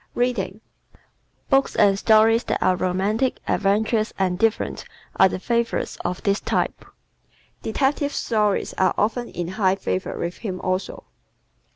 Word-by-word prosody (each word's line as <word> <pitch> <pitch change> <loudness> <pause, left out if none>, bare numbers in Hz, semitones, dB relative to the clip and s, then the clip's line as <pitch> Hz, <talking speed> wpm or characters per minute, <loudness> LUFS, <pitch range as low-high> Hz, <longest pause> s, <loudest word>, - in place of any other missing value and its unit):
Reading 225 -4 -1 0.3
¶ - - -28 0.5
Books 270 0 +3
and 195 -1 +4
stories 225 +2 +4
that - - 0
are 185 - +2
romantic, 195 +8 0
adventurous, 215 +2 +1
and 185 -2 0
different 225 0 0 0.3
are 190 - +6
the - - -3
favorites 235 +4 -1
of 180 +1 -3
this 200 0 +1
type. - - -1 0.8
Detective 280 +5 0
stories 210 -6 0
are 185 -2 +3
often 235 +3 0
in 175 -1 -4
high 190 -1 +1
favor 190 -1 -3
with 170 +1 -4
him 185 -5 -4
also. 185 +1 -3
210 Hz, 140 wpm, -23 LUFS, 185-230 Hz, 0.8 s, are